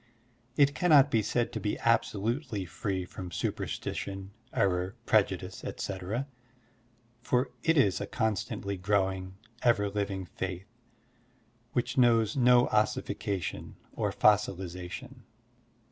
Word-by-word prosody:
It 140 -1 +5
cannot 145 -6 +5
be 110 - +3
said 115 +3 -1
to - - -2
be 105 - -1
abso 115 -3 +1
lutely 115 -2 -2
free 90 +2 -3
from 90 0 -8
superstition, 95 +3 -4 0.2
sCrror, 90 0 +1
prejudice, - - +1
etc., 100 +7 -3 1.0
for 125 +1 +1
it 165 0 +2
is 100 -10 +3
a - - -3
constantly 105 -3 -2
growing, 95 -1 0 0.3
ever 105 -4 +3
living 100 -2 -2
faith 95 +1 -5 1.1
which 125 +2 0
knows 115 -3 +4
no 125 -1 +5
ossification 100 -4 -1 0.2
or - - -1
fossilization. 100 +5 0
105 Hz, 110 wpm, -30 LUFS, 95-120 Hz, 1.1 s, It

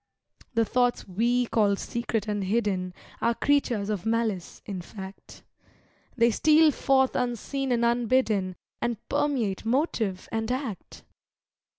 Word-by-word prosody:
The 230 0 +3
thoughts 245 +2 +1
we 240 +6 +1
call 210 -3 +2
secret 225 0 -3
and 205 -2 -1
hidden 195 -3 0 0.3
Are 235 - +2
creatures 245 -8 +1
of 205 -4 -2
malice, 225 -5 -1
in 195 -3 -5
fact. 190 +1 -11 0.7
They 235 0 +5
steal 310 +6 +5
forth 265 -1 +2
unseen 250 +2 -2
and 235 -1 +2
unbidden, 235 -5 +1 0.3
And 240 -1 -1
permeate 240 -10 0
motive 225 - 0
and 225 +1 -1
act. 255 - -5
230 Hz, 120 wpm, -27 LUFS, 200-250 Hz, 0.7 s, They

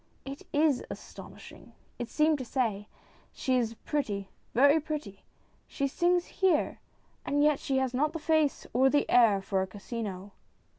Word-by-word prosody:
" - - -39
It 275 +1 -8
is 295 -3 +2
astonishing! - - -11
" - - -37
it 240 -1 -4
seemed 305 +1 +2
to - - -3
say. 225 -5 -2 0.2
'' - - -31
She 260 - 0
is 230 -2 -1
pretty, 205 -10 -2 0.3
very 285 +5 +6
pretty. 290 -11 -6 0.5
She 275 - -1
sings 350 +4 +1
here, 370 -6 +1 0.4
and 290 +1 +1
yet 300 -2 +3
she 270 - -1
has 265 -1 0
not 295 +4 +1
the 330 - -4
face 315 -2 +1
or 260 +2 +4
the 290 +1 +2
air 215 -5 +5
for 195 -1 0
a 190 - -2
casino." 200 -1 -6
265 Hz, 170 wpm, -29 LUFS, 225-300 Hz, 0.5 s, very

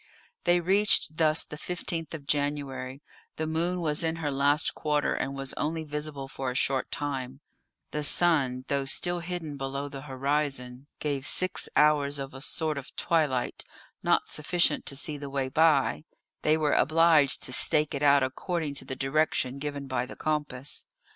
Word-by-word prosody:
They 175 0 +4
reached 190 -3 +3
thus 155 -1 +3
the 150 - -9
15th 165 -1 -4
of 145 -3 -9
January; 140 -2 -2 0.3
the 160 - -2
moon 170 +3 0
was 155 -1 +1
in 160 0 0
her 155 -3 -2
last 145 +3 +2
quarter, 150 -1 0
and 135 +1 -3
was 135 -1 -3
only 160 +1 -2
visible 150 -2 -4
for 135 -1 -4
a 125 - -4
short 135 0 +1
time; 135 -2 -4 0.5
the 150 - -2
sun, 140 -5 +2
though 140 -1 0
still 175 +6 +1
hidden 170 -4 -5
below 140 +1 -4
the 140 -1 -8
horizon, 135 -1 -2
gave 140 -2 -2
six 185 0 +2
hours 145 -1 +3
of 135 0 -6
a 135 - -9
sort 155 0 +1
of 135 - -13
twilight, 150 -7 0 0.4
not - - +2
sufficient 155 0 +1
to 140 - -1
see 145 +2 -3
the 140 -1 -7
way 135 -1 -2
by; 155 0 +3 0.4
they 155 +1 +3
were 150 -2 +1
obliged 155 -2 +4
to 130 - -2
stake 150 +3 +3
it 140 - -3
out 140 -1 +5
according 155 +3 -2
to 140 - -4
the 130 - -5
direction 135 -1 0
given 145 -1 -4
by 130 -2 -2
the - - -9
compass. 150 -3 -2
145 Hz, 170 wpm, -28 LUFS, 135-155 Hz, 0.5 s, out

